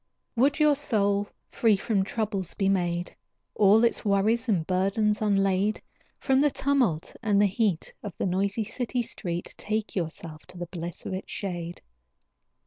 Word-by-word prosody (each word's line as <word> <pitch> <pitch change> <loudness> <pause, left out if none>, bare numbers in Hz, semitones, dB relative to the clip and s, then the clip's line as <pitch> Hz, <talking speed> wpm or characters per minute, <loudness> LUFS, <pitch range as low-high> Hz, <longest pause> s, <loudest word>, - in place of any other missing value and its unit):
Would 275 +6 +3
your 300 -1 +5
soul 205 -7 +1 0.2
free 220 -4 +3
from 200 -1 0
troubles 195 -3 -3
be 195 - +1
made? 175 -2 -1 0.4
All 210 +2 +5
its 235 - +2
worries 220 +4 +2
and 190 -6 +3
its - - -9
burdens 200 +4 +1
unlade? 195 0 +2 0.4
From 265 -1 +2
the 295 +1 +4
tumult 260 - 0
and 210 -4 +2
the 205 - +5
heat 195 -3 0
Of 205 -5 -7
the - - -1
noisy 195 +4 0
city 245 +3 -2
street, 175 -5 -4
Take 215 0 -2
yourself 160 -3 -4
to 180 - -11
the 175 - -4
bliss 170 -1 -7
of - - -3
its 185 - -6
shade. 175 -3 -5
200 Hz, 160 wpm, -27 LUFS, 185-225 Hz, 0.4 s, your